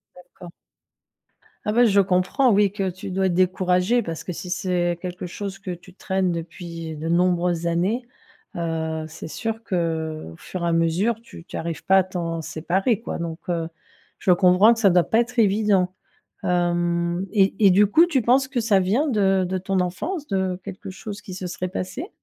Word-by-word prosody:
D'accord. 180 -1 -13 1.1
Ah, 210 - +1
bah, 245 +1 +5
je 200 -3 +4
comprends 190 +8 +2
oui, 200 -1 +4
que 195 -2 -2
tu 190 +3 -8
dois 190 +1 0
être 175 - 0
découragée 185 +5 +2
parce 165 0 -5
que 180 - -5
si 180 - -7
c'est 175 -2 0
quelque 180 0 -5
chose 195 +2 -6
que 190 -2 -6
tu 175 +1 -10
traînes 190 -2 -1
depuis 165 -1 -6
de 160 +2 -4
nombreuses 175 -1 +1
années, 200 +9 0 0.5
heu, 160 -2 -2
c'est 160 - -9
sûr 225 +5 -4
qu'au 160 - -3
fur 185 -2 -6
et 170 - +1
à - - +1
mesure 165 +7 +2
tu 170 - -13
tu - - -7
arrives 165 0 -4
pas 190 - +5
à 190 - +5
t'en 170 -3 -4
séparer 190 +9 -1
quoi. - - -4
Donc, 165 -1 -5
heu, 165 -2 -1 0.5
je 185 - +2
peux - - +6
comprendre 185 +5 +5
que 230 - -6
ça 200 -4 +5
doit 180 -1 +4
pas 220 - +2
être 240 +1 -1
évident. 200 -3 +3 0.5
Hem, 175 0 0
et 195 -3 +3
et 195 - +8
du 200 +3 +5
coup 325 - +5
tu 275 -7 +1
penses 260 +4 +3
que 265 -3 -1
ça 220 -3 +3
vient 220 +12 +1
de 195 -5 +2
de 185 0 -1
ton 190 0 -1
enfance, 295 - -3
de 190 -2 -1
quelque 195 -1 -8
chose 205 +2 -8
qui 185 -2 -9
se 185 0 -5
serait 180 +1 -4
passé? 190 - -5
185 Hz, 195 wpm, -23 LUFS, 170-205 Hz, 1.1 s, et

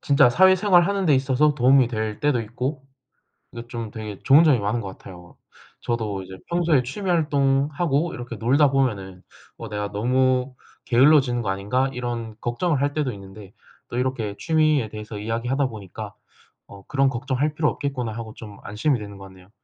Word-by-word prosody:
진짜 140 -3 +4
사회생활 185 - +5
하는 200 -2 -1
데 150 - +5
있어서 135 +3 +2
도움이 130 0 +4
될 110 -2 -4
때도 145 -5 +1
있고 130 +5 -5 0.7
이게 120 0 -9
좀 115 -3 -6
되게 105 -3 -7
좋은 145 +5 +6
점이 135 -7 +4
많은 105 +4 -1
것 100 - -6
같아요. 90 -2 -12 0.4
저도 110 -5 -3
이제 95 0 -11
평소에 170 -6 +2
취미 190 +10 -5
활동하고 145 0 +1
이렇게 120 -2 -7
놀다 135 +6 +3
보면은 100 -9 -1 0.4
'어 - - -7
내가 105 -1 -4
너무 130 +4 +1 0.3
게을러지는 130 -1 +4
거 105 - -3
아닌가?' 105 +8 0
이런 120 -3 -5
걱정을 140 +5 -1
할 145 0 0
때도 145 -5 -1
있는데 100 0 -12 0.4
또 120 - -5
이렇게 125 -5 -2
취미에 155 -7 +2
대해서 105 0 -8
이야기하다 115 +6 -1
보니까 105 -2 -9 0.5
'어 100 -1 -13
그런 135 -1 +2
걱정 130 +1 -3
할 150 +2 +1
필요 155 -1 +2
없겠구나.' 125 -5 -4
하고 110 -1 -7
좀 105 -3 -11
안심이 125 +6 0
되는 100 -1 -9
것 100 - -11
같네요. 95 0 -16
125 Hz, 375 characters per minute, -23 LUFS, 105-140 Hz, 0.7 s, 좋은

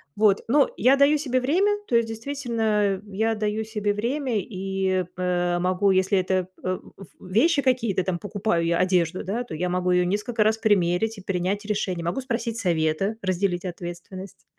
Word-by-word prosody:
вот, 205 -2 +3
но 280 +4 +4
я 260 +3 +5
даю 280 +2 +5
себе 260 -4 0
время. 355 +11 +2 0.2
То 240 - 0
есть, 230 -1 +3
действительно, 225 -5 -1
я 220 +3 0
даю 215 0 -1
себе 210 -2 -2
время 245 +6 -2
и, 190 -1 -1
э, 175 -1 0
могу, 185 +2 +1
если 190 +1 +3
это, 185 0 0 0.2
э, 185 0 -1 0.2
в 195 - -11
в - - -13
вещи 290 - +4
какие-то, 230 -8 +1
там 180 -1 -2
покупаю 205 -3 -1
я 170 0 +2
одежду, 180 -1 +1
да, 220 +6 -2
то 240 - -8
я 180 +3 -1
могу 180 0 0
её 180 0 +3
несколько 210 +4 0
раз 215 +1 +2
примерить 205 0 +1
и - - -9
принять 195 +2 -2
решение. 195 -5 -2
Могу 175 +10 -1
спросить 235 -3 -3
совета, 170 +3 0
разделить 185 -1 -1
ответственность. 180 +2 -8
200 Hz, 175 wpm, -24 LUFS, 180-225 Hz, 0.2 s, я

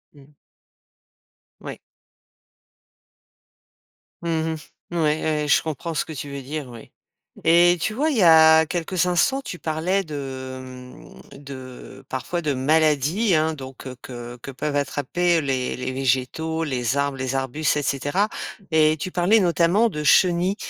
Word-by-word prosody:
Mmh. 140 -2 -17 1.3
Ouais. - - -8 2.5
Mmh 170 - -2
mh, 160 0 -1 0.4
ouais, - - 0
ouais, 155 -1 +1 0.2
ouais, - - -3
je 140 - +4
comprends 160 +1 -5
ce 155 - 0
que - - -10
tu 145 0 -6
veux 140 0 -6
dire, 140 0 -6
oui 115 -2 -12 0.5
et 175 +2 +5
tu 215 - -1
vois, 290 +8 0
il 275 - -1
y 205 - +4
a 160 -1 +7
quelques 175 +2 -1
instants, 265 +10 +2
tu 180 -9 -7
parlais 165 +5 -1
de, 135 -4 -6
mmh, 125 - -12 0.2
de 130 -3 -10
parfois 135 +7 -3
de 150 -2 0
maladies, 155 - +2
hein, 155 +1 +1
donc 130 -3 -9
que 130 -1 -7
que 120 -1 -8
que 140 - -7
peuvent 145 +2 -3
attraper 160 +4 0
les 130 -3 -2
les 125 - -3
végétaux, 135 +5 -1
les 130 -3 -1
arbres, 140 -1 -1
les 130 0 -2
arbustes 135 +3 0
et 145 - -1
cetera, 145 +10 0 0.4
et 155 0 +4
tu 185 - -4
parlais, 180 +6 +3
notamment, 180 +4 +3
de 150 -7 -5
chenilles 175 +4 +3
155 Hz, 155 wpm, -23 LUFS, 135-170 Hz, 2.5 s, a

